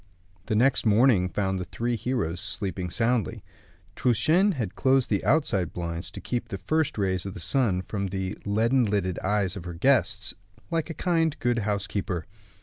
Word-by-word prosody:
The 110 - 0
next 130 +4 +3
morning 110 -4 +4
found 95 0 -1
the - - -2
three 120 +6 -2
heroes 115 -9 -2
sleeping 95 -3 -3
soundly. 115 +4 0 0.5
Truchen 155 - +3
had 115 - -3
closed 130 -2 +2
the 100 - +1
outside 105 - +1
blinds 85 -1 -4
to - - -9
keep 120 -1 -3
the 100 - -5
first 155 +7 0
rays 95 -3 0
of 95 - -6
the - - -6
sun 95 - +1
from 100 -1 -3
the 95 0 -3
leaden 115 +5 +2
lidded 100 -4 -1
eyes 100 -1 0
of 95 -4 -7
her 90 -1 -6
guests, 110 -2 +2 0.4
like 165 0 -1
a 165 - -5
kind, 165 -4 +1
good 120 -1 +1
housekeeper. 100 -4 -2
105 Hz, 170 wpm, -26 LUFS, 95-125 Hz, 0.5 s, morning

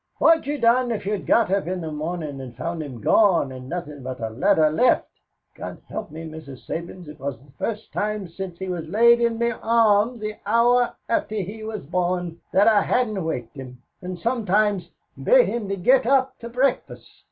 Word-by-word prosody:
What'd 325 -3 +4
you 295 +1 -1
done 245 0 +3
if 215 -4 -3
you'd 205 0 -3
got 230 -5 +3
up 195 -3 0
in 185 0 -2
the 160 -1 -5
mornin' 155 -2 -4
and 125 -2 -9
found 165 +6 -4
him 130 -7 -8
gone 175 - +3
and 130 0 -9
nothin' 155 -5 -5
but 130 0 -6
a 110 -2 -3
letter 155 - +3
left? 245 +11 +3 0.5
God - - -7
help - - -5
me, 160 +2 -8
Mrs. 155 -5 -10
Sabins, 170 +1 -6
it 150 0 -11
was 135 -2 -4
the 135 +4 -21
first 220 -1 -4
time 210 -2 -2
since 175 +1 -7
he 190 - -5
was 175 -3 -4
laid 235 +6 +5
in 235 -1 +1
me 235 +1 +1
arms 225 0 +2
the 215 0 -5
hour 240 +2 +3
after 215 -2 -1
he 210 +2 -4
was 215 -1 -5
born, 175 +1 -2
that 200 +3 +4
I 215 -2 +5
hadn't 215 -4 0
waked 125 -6 -4
him 125 -2 -10 0.2
and 180 0 -5
sometimes 210 -4 0 0.3
bate - - +6
him 225 -4 -3
to 195 - -1
get 250 +8 +4
him 265 - +3
up 260 -1 +1
to 235 - -7
breakfast. 255 +2 -1
195 Hz, 200 wpm, -23 LUFS, 160-230 Hz, 0.5 s, bate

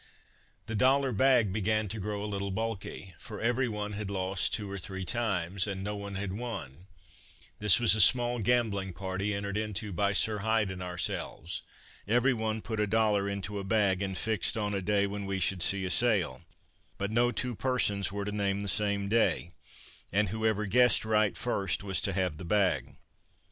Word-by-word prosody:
The 110 - -5
dollar 135 +5 +3
bag 120 -3 +3
began 110 +1 0
to 110 - -4
grow 105 +1 -3
a - - -3
little 100 -1 -3
bulky, 100 -2 -4
for - - -8
every 125 +3 +1
one 105 -1 -4
had 105 -1 -4
lost 95 -1 +1
two 105 -2 -2
or 100 0 -5
three 95 +1 -5
times, 100 -3 0
and 95 -1 -4
no 105 +1 -3
one 100 -1 -6
had 95 -1 -3
won: 95 - -6 0.7
this 105 -2 +6
was 120 -3 +5
a 110 - +4
small 120 +4 +5
gambling 105 -4 +1
party 95 +3 -2
entered 100 0 -3
into 105 -1 -3
by 100 +3 +1
Sir 105 +1 +2
Hyde 110 -1 +1
and 90 0 -7
ourselves; 90 -1 -3 0.5
every 120 +5 +3
one 110 -1 -2
put 110 -2 -4
a 105 - +1
dollar 105 -2 +2
into 100 +1 -4
a - - -5
bag, 95 -2 +2
and 95 -2 -2
fixed 110 +3 0
on 105 -1 -1
a 100 - -1
day 100 +1 +2
when 100 0 -4
we 100 0 -1
should 95 0 +1
see 100 +2 +1
a 90 - -2
sail, 95 - +1 0.6
but 100 +1 -3
no 120 +2 +3
two 125 0 -2
persons 105 -6 +1
were 100 0 -4
to 105 - -3
name 100 -1 -1
the - - -4
same 100 0 0
day, 110 -5 +1 0.6
and 100 0 +2
whoever 110 0 0
guessed 125 +1 +4
right 110 -2 +2
first 100 -6 -1
was 95 -2 0
to 100 - 0
have 90 -4 -1
the - - -7
bag. 95 0 +1
100 Hz, 190 wpm, -30 LUFS, 95-110 Hz, 0.7 s, this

